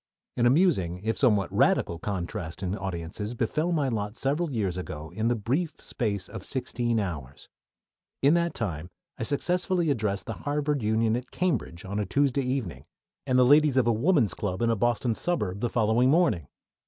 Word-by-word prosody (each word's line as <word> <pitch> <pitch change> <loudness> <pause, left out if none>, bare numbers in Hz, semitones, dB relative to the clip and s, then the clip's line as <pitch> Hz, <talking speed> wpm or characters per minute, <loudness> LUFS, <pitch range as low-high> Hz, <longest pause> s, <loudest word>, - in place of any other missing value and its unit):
An 120 -1 +3
amusing, 120 - +2
if 110 +1 0
somewhat 105 -8 +2
radical, 85 -1 +2
contrast 95 -1 -4
in 95 +1 -1
audiences 95 +3 -5
befell 150 +9 0
my 150 -5 +1
lot 105 -2 -3
several 150 +4 0
years 100 -8 -1
ago 80 -4 -6
in 110 +1 -1
the 120 - +2
brief 135 - -2
space 100 -6 -3
of 110 -4 -8
sixteen 120 -2 -1
hours. 75 -10 -5 0.7
In 140 +3 +6
that 170 0 +1
time 85 -6 -3 0.3
I - - -6
successively 175 +6 +1
addressed 105 -6 -1
the - - -4
Harvard 145 -1 -1
Union 110 +1 +2
at 125 +1 -5
Cambridge 130 - -2
on 100 +2 -3
a 105 - -2
Tuesday 140 +5 +2
evening, 125 -8 -3 0.4
and 130 - +3
the 125 - +6
ladies 145 0 +5
of 130 - +4
a 120 - +3
Woman's 125 - +2
Club 100 +1 -3
in 115 - +3
a - - +2
Boston 120 +2 +1
suburb 105 - -2
the 120 - 0
following 115 +2 +3
morning. 135 - +2
115 Hz, 180 wpm, -27 LUFS, 100-140 Hz, 0.7 s, In